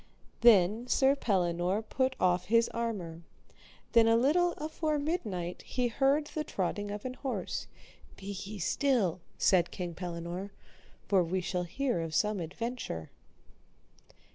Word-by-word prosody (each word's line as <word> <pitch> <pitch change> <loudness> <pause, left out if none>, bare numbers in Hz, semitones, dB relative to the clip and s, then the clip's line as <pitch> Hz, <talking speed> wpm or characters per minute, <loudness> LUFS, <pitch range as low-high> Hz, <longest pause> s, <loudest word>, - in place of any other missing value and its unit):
Then 220 +1 +5
Sir 270 +2 +4
Pellinore 185 -3 0
put 260 +4 0
off 180 0 +2
his 230 +3 +3
armour; 200 -9 -4 0.7
then 230 -2 +6
a 225 0 +5
little 345 +8 +3
afore 310 0 -2
midnight 215 - -3
they 250 -1 +2
heard 275 +5 +2
the 305 +1 -4
trotting 205 - -2
of 205 +2 -6
an 255 - -3
horse. 265 0 -4 0.5
Be 195 +1 -6
ye 210 +2 -7
still, 200 - +1 0.2
said 180 -3 +3
King 175 -2 -5
Pellinore, 175 +2 -5 0.6
for 190 -3 +4
we 180 +3 -1
shall 180 0 -2
hear 245 0 -1
of 160 -1 -4
some 210 -2 +1
adventure. 180 - -5
210 Hz, 135 wpm, -31 LUFS, 180-255 Hz, 0.7 s, then